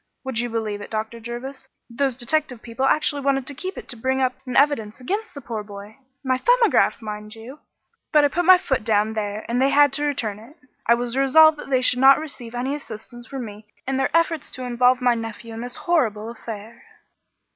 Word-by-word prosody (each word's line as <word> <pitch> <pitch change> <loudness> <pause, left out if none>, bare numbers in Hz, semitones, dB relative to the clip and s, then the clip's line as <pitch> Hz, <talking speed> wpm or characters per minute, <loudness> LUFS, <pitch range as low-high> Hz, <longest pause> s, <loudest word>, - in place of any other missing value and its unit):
Would 260 -4 -3
you 240 0 -1
believe 220 -3 -3
it, - - -9
Dr. 220 +1 -4
Jervis, 240 +4 -7 0.2
those 255 +1 -1
detective 265 -1 -1
people 235 +3 -2
actually 290 0 +2
wanted 270 -1 0
to 285 - -4
keep 370 +8 -6
it - - -8
to - - -4
bring 260 +3 -1
up 255 -1 +1
in 250 - -4
evidence 270 -7 +2
against 405 - -4
the 280 - -7
poor 230 -3 -5
boy. 205 +1 -11 0.3
My 260 -1 0
'Thumbograph,' 485 - +3
mind 210 0 -7
you. 245 +6 -11 0.5
But 300 -2 +5
I - - +3
put 350 +5 -1
my 370 +1 +9
foot 280 - -1
down 215 0 +1
there 210 -1 -4
and 245 +2 0
they 270 - +4
had 285 0 +5
to 290 +2 0
return 225 -8 -2
it. 250 +9 -16 0.3
I 235 - +6
was 240 0 -3
resolved 300 +3 +5
that - - -9
they 260 -2 +2
should 250 -1 +4
not 270 +1 +7
receive 250 -6 -8
any 255 +3 -2
assistance 240 -3 -9
from 270 -3 -5
me 210 0 -11 0.2
in 270 0 0
their 270 - +1
efforts 330 -2 0
to 255 - -6
involve 250 +1 +2
my 245 -1 +4
nephew 225 0 -6
in 225 - -6
this 245 +1 -5
horrible 230 -10 0
affair." 225 -1 -9
250 Hz, 215 wpm, -22 LUFS, 225-275 Hz, 0.5 s, my